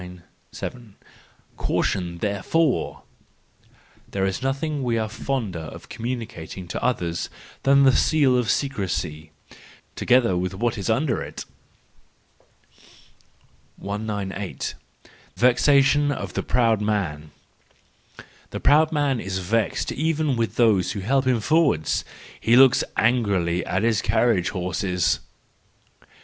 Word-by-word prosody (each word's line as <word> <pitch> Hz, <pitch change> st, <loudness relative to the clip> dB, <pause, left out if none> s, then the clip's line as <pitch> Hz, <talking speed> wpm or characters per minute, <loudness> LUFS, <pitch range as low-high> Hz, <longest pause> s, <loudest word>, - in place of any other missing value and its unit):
Caution 90 Hz, -3 st, -1 dB
therefore 105 Hz, -, 0 dB
I -, -, -36 dB, 0.4 s
—There 95 Hz, -1 st, -1 dB
is 95 Hz, -1 st, -2 dB
nothing 140 Hz, +3 st, -2 dB
we 120 Hz, -3 st, 0 dB
are 110 Hz, -1 st, -1 dB
fonder 115 Hz, -5 st, -3 dB
of 80 Hz, -1 st, -10 dB
communicating 110 Hz, -7 st, -6 dB
to -, -, -4 dB
others 85 Hz, -9 st, -1 dB, 0.3 s
than 140 Hz, 0 st, +5 dB
the 130 Hz, -2 st, +5 dB
seal 145 Hz, -5 st, +3 dB
of 125 Hz, -4 st, +1 dB
secrecy—together 95 Hz, -, -2 dB
with 90 Hz, +1 st, -2 dB
what 115 Hz, +2 st, -1 dB
is 100 Hz, -, -3 dB
under 125 Hz, +3 st, +1 dB
it. -, -, -7 dB, 2.3 s
198. 100 Hz, -1 st, -4 dB, 0.6 s
Vexation 140 Hz, +3 st, +4 dB
of 140 Hz, -, -5 dB
the -, -, -1 dB
Proud 115 Hz, -4 st, +2 dB
Man, 90 Hz, -8 st, -2 dB, 1.2 s
—The -, -, -5 dB
proud 155 Hz, +2 st, +4 dB
man 145 Hz, -5 st, +1 dB
is 95 Hz, -2 st, -3 dB
vexed 105 Hz, +4 st, -1 dB
even 155 Hz, -2 st, 0 dB
with 115 Hz, -1 st, -1 dB
those 110 Hz, -6 st, +3 dB
who 100 Hz, -, -4 dB
help 130 Hz, +6 st, +1 dB
him 125 Hz, -2 st, +3 dB
forward: 145 Hz, -, +2 dB, 0.5 s
he 115 Hz, -, +3 dB
looks 130 Hz, 0 st, +6 dB
angrily 100 Hz, -8 st, +1 dB
at 95 Hz, +4 st, 0 dB
his 115 Hz, -3 st, +2 dB
carriage 110 Hz, -7 st, +2 dB
horses! 90 Hz, -1 st, -1 dB
110 Hz, 110 wpm, -23 LUFS, 95-130 Hz, 2.3 s, looks